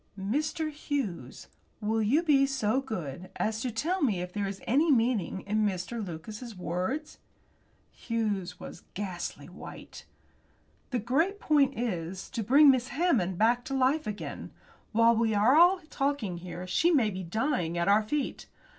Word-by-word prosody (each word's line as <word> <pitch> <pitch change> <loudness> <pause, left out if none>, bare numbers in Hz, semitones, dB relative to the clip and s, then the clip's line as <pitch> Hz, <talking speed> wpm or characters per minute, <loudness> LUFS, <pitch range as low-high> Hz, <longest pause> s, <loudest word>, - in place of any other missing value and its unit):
"Mr. 305 +9 -1
Hughes, 240 - -4 0.3
will 220 +1 0
you 265 +11 +2
be 275 -4 +4
so 260 -2 0
good 185 - -6
as 220 +1 -1
to 255 - -1
tell 320 - -1
me 220 - +2
if 180 0 -5
there 205 -1 -1
is 195 0 -5
any 295 +7 +3
meaning 230 -7 +1
in 215 +2 0
Mr. 205 +3 -2
Lucas's 210 +6 -8
words?" 185 - -3 0.7
Hughes 210 -6 -3
was - - -9
ghastly 185 -3 -5
white. - - -11 0.8
"The 255 - -1
great 310 - 0
point 280 -5 +2
is 185 -6 -3
to 230 - -3
bring 275 +7 +7
Miss 255 -1 0
Hammond 250 - +1
back 235 +4 +3
to 270 - -3
life 270 +4 +2
again. 210 -1 -5 0.4
While 230 +1 +5
we 225 -1 +1
are 315 - +6
talking 270 -10 -1
here 175 +1 -7
she 310 - +2
may 255 -11 +3
be 190 0 -5
dying 180 - -1
at 170 - 0
our 205 +2 +5
feet. 270 +6 -3
225 Hz, 155 wpm, -29 LUFS, 190-275 Hz, 0.8 s, bring